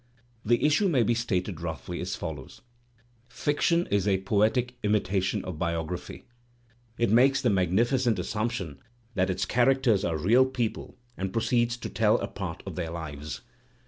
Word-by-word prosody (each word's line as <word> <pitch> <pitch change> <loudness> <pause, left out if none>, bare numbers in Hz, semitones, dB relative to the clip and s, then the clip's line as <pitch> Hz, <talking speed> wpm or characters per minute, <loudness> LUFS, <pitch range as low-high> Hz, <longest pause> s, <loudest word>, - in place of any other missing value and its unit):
The 120 +5 +2
issue 155 +7 +3
may 130 -8 +3
be 120 - +2
stated 95 -7 -2
roughly 85 +1 -5
as 90 +1 -3
follows: 75 -6 -7 0.7
Fiction 170 +6 +1
is 100 -1 +2
a 95 -2 +2
poetic 110 +5 +1
imitation 100 -1 0
of 90 -4 -6
biography. 85 +5 -3 0.7
It 115 -3 +1
makes 135 +4 +5
the 125 -4 +2
magnificent 110 +6 +2
assumption 105 - -3 0.3
that 95 -2 +1
its 95 0 -1
characters 125 -4 +3
are 80 -2 0
real 115 +11 +4
people 120 -3 -3 0.2
and 95 0 -3
proceeds 120 +2 +1
to - - -6
tell - - +3
a - - -3
part - - -6
of - - -5
their 85 -3 -3
lives. 75 -5 -6
105 Hz, 150 wpm, -27 LUFS, 90-120 Hz, 0.7 s, makes